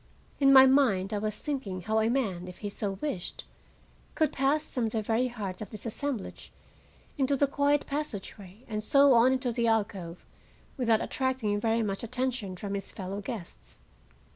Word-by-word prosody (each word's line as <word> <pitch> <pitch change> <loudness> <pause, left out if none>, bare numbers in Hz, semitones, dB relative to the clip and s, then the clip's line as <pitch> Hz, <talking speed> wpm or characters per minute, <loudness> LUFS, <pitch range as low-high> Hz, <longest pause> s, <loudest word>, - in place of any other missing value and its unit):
In 275 -1 +6
my 265 -1 +10
mind 230 -8 +3
I 205 - 0
was 215 0 -2
thinking 240 -11 -4
how 220 +4 0
a 220 +1 +2
man, 200 -9 -1
if 180 - -9
he - - -1
so 200 0 -2
wished, 275 -13 -4 0.7
could 310 -2 +2
pass 280 +3 0
from 240 -3 0
the 220 0 -1
very 230 +4 +1
heart 205 -6 -6
of 210 - -6
this 215 +1 -10
assemblage 240 -1 -5 0.7
into 275 +1 +2
the 285 - +4
quiet 285 +1 +1
passageway, 215 -7 -5
and 215 -2 -3
so 275 +3 +5
on 240 +2 +6
into 255 -1 -1
the 235 0 0
alcove, 200 -6 -1 0.5
without 230 -4 +2
attracting 255 -6 -1
very 225 +1 +1
much 195 -2 -2
attention 250 -4 -2
from 200 +2 -5
his 195 -1 -4
fellow 195 +1 -5
guests. 175 - -8
225 Hz, 170 wpm, -29 LUFS, 200-265 Hz, 0.7 s, my